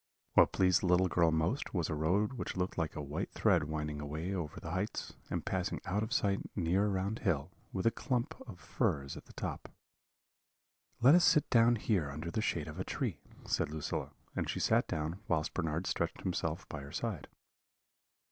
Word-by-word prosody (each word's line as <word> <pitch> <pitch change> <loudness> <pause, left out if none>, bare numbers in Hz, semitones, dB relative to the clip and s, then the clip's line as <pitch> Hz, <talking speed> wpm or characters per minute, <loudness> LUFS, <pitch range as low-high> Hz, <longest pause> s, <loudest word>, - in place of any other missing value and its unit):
What - - +6
pleased 90 -2 +4
the 95 - 0
little 90 +1 +5
girl 85 -2 +3
most 80 - 0
was 85 -3 +1
a - - -2
road 90 - +1
which 120 - -4
looked 90 0 -1
like 80 -3 -2
a 75 - -3
white 70 +2 -3
thread - - +3
winding 75 -1 -3
away 80 +6 -3
over 85 -6 -4
the 80 - -6
heights, 95 +5 -2 0.2
and - - -2
passing 95 +1 -1
out 95 +2 0
of 110 - -3
sight 100 -1 +2 0.2
near 95 +2 +2
around 100 +2 -1
hill, 80 - 0 0.2
with 95 - -2
a 115 - +5
clump 120 0 -1
of 95 -7 -9
firs 70 -3 -1
at - - -10
the - - -15
top. - - -5 1.3
"'Let 130 +5 +8
us 175 0 +7
sit 150 -5 +5
down 120 0 +6
here 100 -9 0
under 75 +4 -5
the 110 - 0
shade - - -1
of - - -7
a - - 0
tree,' - - -3 0.2
said - - 0
Lucilla; 75 0 -3 0.3
and - - -1
she - - -2
sat - - +3
down, 80 +3 -2
whilst 75 -1 0
Bernard 80 0 -1
stretched 85 -1 -1
himself 85 -2 -2
by 75 - -6
her 70 +1 -9
side. 100 -1 -3
90 Hz, 195 wpm, -33 LUFS, 80-100 Hz, 1.3 s, Let